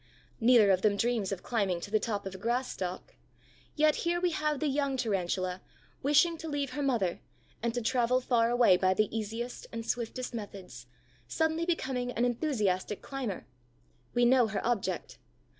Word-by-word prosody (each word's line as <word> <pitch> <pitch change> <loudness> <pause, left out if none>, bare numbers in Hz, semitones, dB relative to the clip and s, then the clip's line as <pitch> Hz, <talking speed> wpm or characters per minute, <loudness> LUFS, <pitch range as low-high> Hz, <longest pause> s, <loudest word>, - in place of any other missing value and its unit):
Neither 230 -4 +6
of 185 -1 +2
them 205 -1 +2
dreams 230 -4 0
of 195 - -4
climbing 200 -7 0
to 200 - -7
the 215 - +3
top 210 -4 -3
of 195 - -5
a 190 - -9
grass 240 +5 -1
stalk. 185 0 -5 0.6
Yet 305 0 +3
here 345 0 0
we 355 0 +1
have 300 -2 -1
the 310 - -1
young 280 -1 0
Tarantula, 185 -4 -1 0.4
wishing 310 +4 +3
to 325 - -6
leave 285 -2 -2
her 290 - -3
mother 235 -11 0 0.4
and 235 +1 0
to 245 - -1
travel 250 +1 +2
far 235 -2 +2
away 240 -6 +5
by 185 0 +2
the 215 +1 0
easiest 225 +3 -4
and 230 -1 -5
swiftest 245 +2 -3
methods, 195 - -8 0.4
suddenly 320 - 0
becoming 260 -7 -1
an 240 - +1
enthusiastic 215 - -1
climber. 260 -8 -4 0.7
We 240 0 +4
know 245 -1 +5
her 215 - -3
object. 240 -4 -2
235 Hz, 175 wpm, -30 LUFS, 200-265 Hz, 0.7 s, Neither